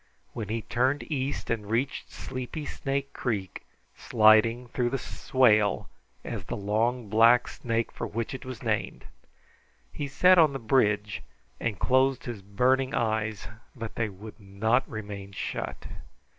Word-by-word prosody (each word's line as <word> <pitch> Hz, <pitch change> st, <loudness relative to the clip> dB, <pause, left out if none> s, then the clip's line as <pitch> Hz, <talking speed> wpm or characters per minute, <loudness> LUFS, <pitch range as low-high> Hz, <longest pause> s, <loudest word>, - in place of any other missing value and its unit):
When 110 Hz, -4 st, -5 dB
he 110 Hz, 0 st, -2 dB
turned 130 Hz, +4 st, +1 dB
east 135 Hz, -3 st, -2 dB
and 105 Hz, -3 st, -2 dB
reached 125 Hz, +5 st, -1 dB
Sleepy 130 Hz, +4 st, -6 dB
Snake 140 Hz, 0 st, -3 dB
Creek, 100 Hz, -7 st, -3 dB, 0.3 s
sliding 115 Hz, +2 st, +4 dB
through 120 Hz, 0 st, 0 dB
the 135 Hz, -, -1 dB
swale 110 Hz, -5 st, +2 dB, 0.3 s
as -, -, -5 dB
the -, -, -4 dB
long 110 Hz, +4 st, 0 dB
black 115 Hz, +4 st, +5 dB
snake 115 Hz, -1 st, -2 dB
for -, -, -5 dB
which 115 Hz, +3 st, -3 dB
it 130 Hz, -, -6 dB
was 130 Hz, -3 st, -8 dB
named, -, -, -2 dB, 0.9 s
he 145 Hz, -, -3 dB
sat 180 Hz, +7 st, +5 dB
on 155 Hz, -4 st, +5 dB
the -, -, -2 dB
bridge 105 Hz, -4 st, +1 dB, 0.4 s
and 110 Hz, -4 st, -2 dB
closed 130 Hz, 0 st, +2 dB
his 120 Hz, -5 st, -5 dB
burning 130 Hz, +7 st, +1 dB
eyes, 110 Hz, -2 st, -1 dB, 0.3 s
but 115 Hz, -3 st, -6 dB
they 110 Hz, -2 st, -1 dB
would 105 Hz, +4 st, -11 dB
not 110 Hz, +6 st, 0 dB
remain 100 Hz, -3 st, -7 dB
shut. -, -, -5 dB
115 Hz, 145 wpm, -28 LUFS, 105-130 Hz, 0.9 s, black